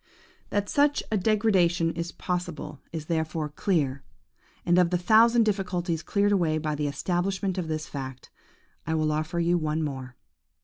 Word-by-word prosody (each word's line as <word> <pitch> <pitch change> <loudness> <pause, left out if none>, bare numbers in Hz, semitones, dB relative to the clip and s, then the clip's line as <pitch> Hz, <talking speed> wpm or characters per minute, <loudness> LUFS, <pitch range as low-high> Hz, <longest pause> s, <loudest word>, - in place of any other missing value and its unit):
– - - -32
"That 205 0 0
such 290 +4 +2
a - - +2
degeneration 185 -5 +2
is 170 +1 -4
possible 175 -5 -4
is 160 -2 -5
therefore 160 -1 -2
clear; 145 -5 0 0.6
and 175 +1 +4
of 180 -2 +4
the 180 - +1
thousand 225 +6 +5
difficulties 180 -5 -1
cleared 205 +2 +1
away 170 -6 +2
by 155 -1 -2
the 150 0 -1
establishment 185 +5 -1
of 170 - -3
this 155 -1 -3
fact, 130 -2 -7 0.6
I 160 - 0
will 155 -1 +1
offer 155 +3 -2
you 170 +1 +2
one 155 0 -1
more. 130 -4 -5
170 Hz, 165 wpm, -27 LUFS, 155-190 Hz, 0.6 s, thousand